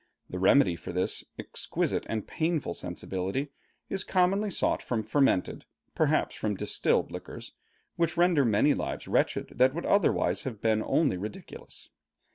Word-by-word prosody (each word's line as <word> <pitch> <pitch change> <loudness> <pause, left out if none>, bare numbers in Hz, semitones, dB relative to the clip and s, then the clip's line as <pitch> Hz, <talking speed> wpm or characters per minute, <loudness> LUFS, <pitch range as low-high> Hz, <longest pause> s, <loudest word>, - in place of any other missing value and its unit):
The 90 - -4
remedy 95 -1 +5
for - - -8
this 90 +1 -1
exquisite - - -2
and 110 -2 -2
painful 160 - -1
sensibility 95 +15 -4 0.4
is 195 -1 -2
commonly 195 +3 +2
sought 190 - 0
from 115 -3 -2
fermented, 110 -4 +1 0.3
perhaps - - +1
from 105 -1 -2
distilled - - +1
liquors, - - -8 0.5
which 170 0 0
render 175 -4 +4
many 115 +5 +3
lives - - -4
wretched - - 0
that 130 +2 +5
would 170 - -3
otherwise 200 -3 +2
have 120 -6 -6
been 110 0 +2
only 145 - +2
ridiculous. 105 +3 -8
130 Hz, 140 wpm, -28 LUFS, 105-165 Hz, 0.5 s, remedy